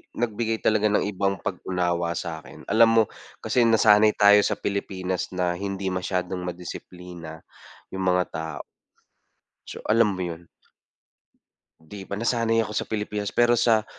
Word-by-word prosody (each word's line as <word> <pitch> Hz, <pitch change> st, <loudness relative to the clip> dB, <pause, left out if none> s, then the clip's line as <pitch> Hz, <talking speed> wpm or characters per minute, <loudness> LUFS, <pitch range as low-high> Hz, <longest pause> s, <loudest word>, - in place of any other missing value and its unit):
nagbigay 115 Hz, -1 st, -1 dB
talaga 110 Hz, -1 st, +3 dB
ng -, -, +2 dB
ibang 100 Hz, -1 st, -1 dB
pag-unawa 90 Hz, -2 st, -2 dB
sakin, 80 Hz, -3 st, -7 dB
alam 115 Hz, +2 st, +6 dB
mo 115 Hz, 0 st, +5 dB, 0.4 s
kasi 125 Hz, -, +2 dB
nasanay 110 Hz, -1 st, +5 dB
tayo 105 Hz, 0 st, +7 dB
sa -, -, 0 dB
Pilipinas 95 Hz, -2 st, -3 dB
na 90 Hz, -1 st, 0 dB
hindi 100 Hz, -1 st, -3 dB
masyadong 90 Hz, 0 st, -2 dB
ma-disiplina 90 Hz, -1 st, -8 dB, 0.5 s
yung 95 Hz, 0 st, -4 dB
mga 90 Hz, 0 st, +3 dB
ta 80 Hz, -, -4 dB, 1.2 s
So -, -, -9 dB
alam 110 Hz, -1 st, +4 dB
mo 95 Hz, -, -5 dB
yun? 85 Hz, -1 st, -5 dB, 1.3 s
Di 95 Hz, +5 st, -11 dB
ba 100 Hz, -, -4 dB
nasanay 115 Hz, 0 st, +1 dB
ako 105 Hz, -, -7 dB
sa 105 Hz, -, -2 dB
Pilipinas 105 Hz, -1 st, -3 dB
pero 120 Hz, 0 st, +4 dB
sa 110 Hz, -2 st, +3 dB
100 Hz, 135 wpm, -25 LUFS, 90-110 Hz, 1.3 s, tayo